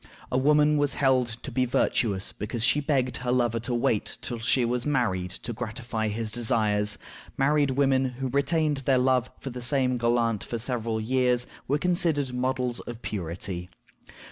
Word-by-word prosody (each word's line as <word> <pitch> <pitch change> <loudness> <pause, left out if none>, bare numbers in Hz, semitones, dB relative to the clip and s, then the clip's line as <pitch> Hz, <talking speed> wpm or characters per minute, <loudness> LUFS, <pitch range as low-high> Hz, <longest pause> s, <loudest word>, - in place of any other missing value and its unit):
A 125 - +2
woman 150 +2 +4
was 145 -1 +1
held 130 -3 +3 0.2
to - - -6
be 130 - +1
virtuous 110 -5 +1
because 110 +2 -4
she 140 +4 +3
begged 135 -4 0
her 125 0 -2
lover 120 -2 +1
to 120 +2 -3
wait 115 -3 0
till 120 -2 -4
she 120 +2 +2
was 120 +1 0
married 110 -11 0
to 120 - -4
gratify 110 -1 -3
his 110 +1 -3
desires; 105 -3 +1 0.4
married 145 +1 +3
women 135 0 +2
who 130 +1 -3
retained 145 +2 +1
their 135 -1 +2
love 130 -1 +2
for 135 - -6
the 125 0 -7
same 125 0 +1
galant 115 -3 +1
for 120 - -4
several 115 -2 -2
years 125 +1 +1 0.2
were 145 - +2
considered 160 -6 +1
models 125 -1 -1
of 120 -1 -8
purity. 90 -1 -4
125 Hz, 170 wpm, -27 LUFS, 115-135 Hz, 0.4 s, woman